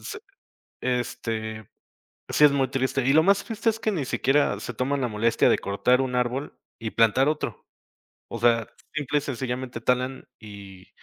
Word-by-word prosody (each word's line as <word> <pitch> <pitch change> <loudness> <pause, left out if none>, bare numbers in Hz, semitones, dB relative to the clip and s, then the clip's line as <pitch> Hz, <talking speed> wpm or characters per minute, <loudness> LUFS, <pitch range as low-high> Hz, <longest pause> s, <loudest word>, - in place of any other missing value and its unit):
se 435 - -7 0.6
este, 115 -3 -3 0.6
sí 150 - +2
es 145 - +8
muy 135 -2 +1
triste, 130 +1 -1
y 135 - +4
lo 160 +1 +6
más 200 +1 +3
triste 225 0 0
es 225 0 -2
que 220 - 0
ni 160 -8 -1
siquiera 135 +3 +1
se 125 - -6
toman 135 +4 -1
la 125 - 0
molestia 115 +1 +2
de - - +4
cortar 125 +6 +1
1 125 -1 -2
árbol 125 +3 -1 0.3
y 110 -1 -4
plantar 115 +5 +3
otro. 155 - -4 0.6
O 115 - -6
sea, 115 -2 +3 0.3
simple 150 -1 0
y - - -2
sencillamente 125 -2 -4
talan 125 +3 -1
y, 100 -3 -12
125 Hz, 175 wpm, -25 LUFS, 115-140 Hz, 0.6 s, es